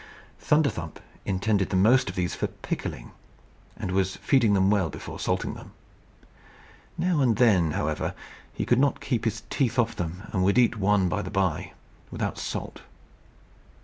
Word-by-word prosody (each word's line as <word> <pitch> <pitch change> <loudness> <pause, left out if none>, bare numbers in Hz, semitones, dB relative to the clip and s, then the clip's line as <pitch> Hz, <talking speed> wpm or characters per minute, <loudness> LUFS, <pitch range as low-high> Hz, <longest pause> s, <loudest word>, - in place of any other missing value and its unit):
Thunderthump 140 - 0 0.3
intended 95 +1 0
the 95 - -1
most 110 +4 +4
of 90 - -7
these 90 -1 -1
for - - -1
pickling, - - -6 0.7
and 90 - -4
was 95 0 0
feeding 120 -7 +3
them 95 +1 +3
well 95 -6 +2
before - - -8
salting - - -1
them. - - -12 1.2
Now 175 -3 +1
and 120 -4 +3
then, 95 -10 +4
however, 75 0 -2 0.4
he - - -3
could 120 - +3
not 140 0 +2
keep 120 -5 -2
his 110 -2 -2
teeth 130 -3 0
off 115 -1 +2
them, 90 +3 -4
and 95 -3 +1
would 100 +5 +3
eat 120 -1 +4
one 100 -2 +2
by 105 +3 -1
the 95 - -6
bye, 95 -5 -1 0.4
without - - -3
salt. - - -5
100 Hz, 160 wpm, -26 LUFS, 95-120 Hz, 1.2 s, most